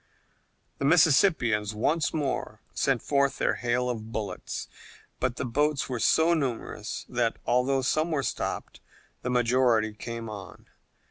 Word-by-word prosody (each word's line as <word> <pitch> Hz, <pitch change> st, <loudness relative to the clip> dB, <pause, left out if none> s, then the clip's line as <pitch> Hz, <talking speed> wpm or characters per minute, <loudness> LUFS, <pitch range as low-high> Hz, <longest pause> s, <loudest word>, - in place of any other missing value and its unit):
The 140 Hz, -, -1 dB
Mississippians 135 Hz, -, +4 dB
once 150 Hz, +8 st, +1 dB
more 140 Hz, -8 st, -2 dB
sent 135 Hz, -4 st, +1 dB
forth 140 Hz, -1 st, +1 dB
their -, -, +1 dB
hail 125 Hz, +1 st, 0 dB
of 115 Hz, -2 st, -4 dB
bullets, 105 Hz, -5 st, -4 dB, 0.5 s
but 130 Hz, -1 st, 0 dB
the -, -, -3 dB
boats 145 Hz, +4 st, 0 dB
were 125 Hz, -2 st, -2 dB
so 160 Hz, +8 st, +4 dB
numerous 120 Hz, -7 st, -3 dB
that, 120 Hz, -2 st, 0 dB
although 130 Hz, +2 st, +2 dB
some 155 Hz, +5 st, +1 dB
were 150 Hz, -4 st, 0 dB
stopped, -, -, -3 dB, 0.4 s
the 125 Hz, -, -3 dB
majority 120 Hz, -3 st, +2 dB
came 115 Hz, +2 st, -6 dB
on. 100 Hz, -4 st, -9 dB
125 Hz, 135 wpm, -27 LUFS, 115-140 Hz, 0.5 s, Mississippians